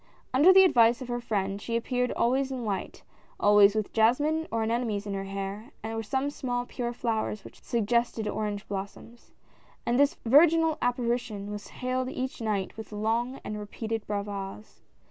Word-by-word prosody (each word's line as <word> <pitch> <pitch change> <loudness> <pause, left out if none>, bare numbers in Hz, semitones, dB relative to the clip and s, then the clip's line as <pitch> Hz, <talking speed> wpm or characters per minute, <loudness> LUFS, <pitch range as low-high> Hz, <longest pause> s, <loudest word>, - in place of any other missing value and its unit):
Under 295 +8 +7
the 380 0 +8
advice 240 -9 +5
of 250 - -10
her 240 0 -2
friend, 200 -3 -2
she 230 - -3
appeared 250 +1 0
always 260 +3 +1
in 255 -2 -4
white 200 -4 -4 0.2
— - - -32
always 205 0 +6
with 215 -2 -2
jasmine 290 +9 +2
or 225 0 0
anemones 220 -2 -1
in 200 - -4
her 195 0 -3
hair, 195 +4 -5
or 225 0 -3
some 265 +6 -1
small 245 -3 -3
pure 240 -1 -4
flowers 225 -3 -2
which - - -14
suggested 235 -1 0
orange 210 -1 -3
blossoms 200 +4 -7 0.3
— - - -31
and 240 +2 +1
this 285 +4 +4
virginal 320 +5 +5
apparition 235 -4 -1
was 205 0 -6
hailed 255 0 -2
each 260 -1 -4
night 210 -4 -2
with 220 -1 -8
long 230 +5 -1
and 210 0 -5
repeated 220 +1 -4
bravas. 200 0 -5
230 Hz, 170 wpm, -28 LUFS, 210-250 Hz, 0.3 s, the